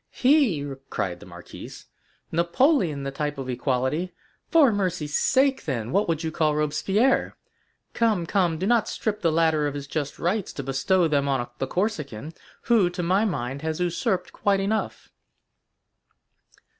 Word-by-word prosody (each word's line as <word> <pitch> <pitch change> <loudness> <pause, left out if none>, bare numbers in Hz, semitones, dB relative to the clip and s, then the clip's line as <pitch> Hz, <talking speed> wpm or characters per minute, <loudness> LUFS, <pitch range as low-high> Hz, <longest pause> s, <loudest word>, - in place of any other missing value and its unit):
"He!" 250 - +2 0.2
cried 90 -3 -3
the - - -13
marquise: - - -11 0.5
"Napoleon 170 - +2
the 135 - -3
type 145 +1 -3
of 135 -1 -5
equality! 130 +7 -1 0.3
For 310 -7 +5
mercy's 175 -7 -2
sake, 270 0 +2
then, 120 -6 -3
what 200 +3 +2
would 165 -1 -1
you 160 - -2
call 155 -1 +1
Robespierre? 190 - +1 0.6
Come, 215 -7 +1
come, 175 -3 +1
do 185 - -2
not 230 0 +2
strip 210 -1 -3
the 165 - +2
latter 160 -2 +2
of 145 - -4
his 140 -1 -5
just 145 0 -4
rights 190 +3 -1
to 140 - -5
bestow 165 +7 +2
them 140 -2 +1
on 135 -3 0
the 135 - -1
Corsican, 155 - -3 0.3
who, 220 -7 +3
to 180 0 -4
my 190 +5 +2
mind, 135 - -3
has 160 +1 -3
usurped 180 +2 -1
quite 200 -1 +1
enough." 210 +3 -2
170 Hz, 155 wpm, -25 LUFS, 145-205 Hz, 0.6 s, For